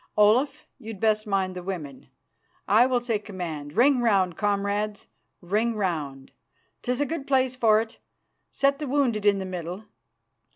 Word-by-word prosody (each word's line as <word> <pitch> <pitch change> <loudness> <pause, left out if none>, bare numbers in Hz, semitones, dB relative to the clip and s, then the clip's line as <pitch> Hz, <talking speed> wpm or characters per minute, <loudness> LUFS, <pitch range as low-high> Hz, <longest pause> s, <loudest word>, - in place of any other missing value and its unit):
Olaf, 265 +9 +3
you'd 220 -4 -8
best 215 0 +1
mind 190 -2 0
the 180 - -5
women; 165 -8 -6 0.6
I 225 +5 +5
will 250 -2 +1
take 225 -4 -2
command. 165 -6 -6
Ring 260 +1 +5
round, 195 -7 +2
comrades, 205 0 -1 0.4
ring 215 +6 0
round! 150 -9 -3 0.5
'Tis 250 +2 -1
a - - +2
good 285 -1 -5
place 260 -2 +2
for 220 -4 +4
it. 225 0 -6 0.5
Set 275 +1 +1
the 300 - -4
wounded 250 -7 +1
in 200 -1 +5
the 190 - -4
middle. 180 +2 -6
210 Hz, 155 wpm, -26 LUFS, 185-245 Hz, 0.6 s, I